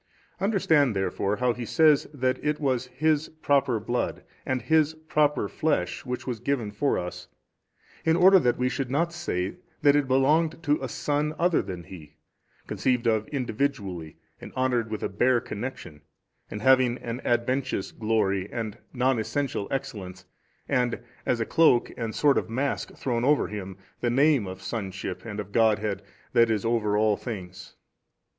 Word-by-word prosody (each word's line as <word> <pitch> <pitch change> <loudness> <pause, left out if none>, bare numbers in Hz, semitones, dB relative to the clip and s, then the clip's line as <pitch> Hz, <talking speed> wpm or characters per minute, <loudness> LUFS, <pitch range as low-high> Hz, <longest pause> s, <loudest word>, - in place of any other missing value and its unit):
Understand 160 - +2
therefore 95 +1 0
how 125 +1 +1
He 125 - -6
says 155 +4 +4
that 130 -3 -1
it 150 0 0
was 130 -4 0
His 155 +2 0
Proper 140 -6 +1
Blood 120 +4 -2 0.2
and 130 -1 -1
His 160 -1 +3
Proper 150 -6 +1
Flesh 100 - -1
which 125 0 -4
was 120 -3 -3
given 120 -3 -1
for 140 +7 0
us, 90 0 -5 0.8
in 160 0 +3
order 190 +2 +7
that 125 -6 +1
we 125 - +1
should 130 0 -2
not 165 +6 0
say 95 - -3 0.3
that 145 -1 +6
it 145 -2 +2
belonged 155 +6 +2
to 150 -2 +1
a 130 - -3
son 150 +4 -1
other 175 -1 +3
than 90 -3 -7
He, 80 -4 -12 0.5
conceived 125 -2 0
of 110 -2 +1
individually 110 - -3 0.3
and - - -9
honoured 125 -3 0
with 110 -1 -4
a - - +1
bare 120 +5 +2
connection 105 - -7 0.5
and 105 +1 -6
having 130 -2 +4
an 120 +1 -5
adventitious 125 -2 0
glory 105 -3 0
and 110 -3 -4
non 130 -1 +2
essential 130 -2 -2
excellence 100 -9 -5 0.4
and, 125 -3 +1 0.3
as 120 - +1
a 115 - 0
cloak 155 -6 +4
and 115 -2 -4
sort 145 -2 +4
of - - -7
mask 135 +5 -2
thrown 120 -3 -1
over 145 +2 +3
him, 95 -3 -6 0.2
the 120 - 0
name 135 -3 +3
of 95 0 -8
sonship 95 -4 -5
and 105 -2 -5
of 100 -1 -5
the - - -22
Godhead 110 -3 +2 0.3
that 115 -2 +5
is 110 -2 0
over 110 -3 +1
all 105 -1 +3
things. 95 -6 -8
125 Hz, 165 wpm, -26 LUFS, 105-140 Hz, 0.8 s, order